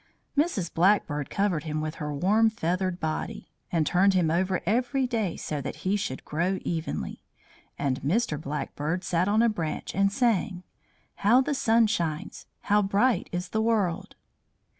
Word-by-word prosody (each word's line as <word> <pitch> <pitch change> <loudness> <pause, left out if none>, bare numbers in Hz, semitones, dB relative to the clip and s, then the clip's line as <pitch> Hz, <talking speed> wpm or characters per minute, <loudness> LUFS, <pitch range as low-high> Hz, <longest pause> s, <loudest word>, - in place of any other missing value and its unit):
Mrs. 285 - 0
Blackbird 165 -5 +2
covered 185 -6 0
him 155 -1 -2
with 155 +1 -4
her 150 0 -2
warm 205 +10 +3
feathered 185 -2 -1
body, 160 -2 -4 0.2
and 165 -3 +2
turned 190 +4 +3
him 170 -4 +2
over 185 +2 0
every 250 +6 +1
day 225 -8 -1
so 150 -2 -4
that - - -5
he 190 +2 +2
should 130 -10 -4
grow 175 +5 0
evenly; 165 -2 -3 0.6
and 135 -3 -1
Mr. 155 - 0
Blackbird 150 +4 -3
sat 175 +1 +1
on 215 +3 +3
a - - +5
branch 170 -8 -3
and 195 +1 +2
sang: 210 -5 0 0.5
"How 225 +5 +5
the 285 +3 +1
sun 230 -4 +3
shines! 170 -8 -3
How 210 0 +3
bright 205 +5 +1
is 180 0 -3
the 220 - 0
world!" 200 -4 0
185 Hz, 160 wpm, -27 LUFS, 160-220 Hz, 0.6 s, a